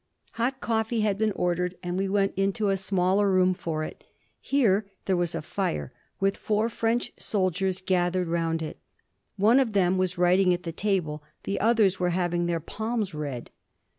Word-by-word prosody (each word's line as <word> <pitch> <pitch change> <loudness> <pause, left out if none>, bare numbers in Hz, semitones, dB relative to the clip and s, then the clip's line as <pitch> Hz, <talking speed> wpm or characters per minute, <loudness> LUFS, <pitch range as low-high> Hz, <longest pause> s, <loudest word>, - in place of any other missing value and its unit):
Hot 255 +3 -1
coffee 225 0 0
had 205 -2 +1
been 220 -1 +2
ordered, 180 0 -1
and 175 0 -3
we 195 +1 0
went 195 0 +1
into 195 +2 +1
a 195 - +3
smaller 195 +1 +2
room 185 0 +4
for 160 -3 -3
it. - - -8 0.4
Here 215 -7 +2 0.2
there 190 - +2
was 175 -1 -1
a 165 - -3
fire, 75 - -3 0.3
with 195 0 +1
four 215 +2 0
French 230 +1 -1
soldiers 190 -1 -1
gathered 180 -1 +1
round 165 -1 0
it. 155 - -6 0.6
One 220 +6 +5
of 245 -5 +1
them 185 -2 +3
was 185 -1 0
writing 180 +1 +4
at 175 - -9
the 165 - -4
table. 165 -5 -1 0.2
The 200 - -2
others 215 -4 +3
were 180 -1 +1
having 175 -1 0
their 170 -1 0
palms 220 +2 -3
read. 145 -5 -5
185 Hz, 175 wpm, -27 LUFS, 175-205 Hz, 0.6 s, One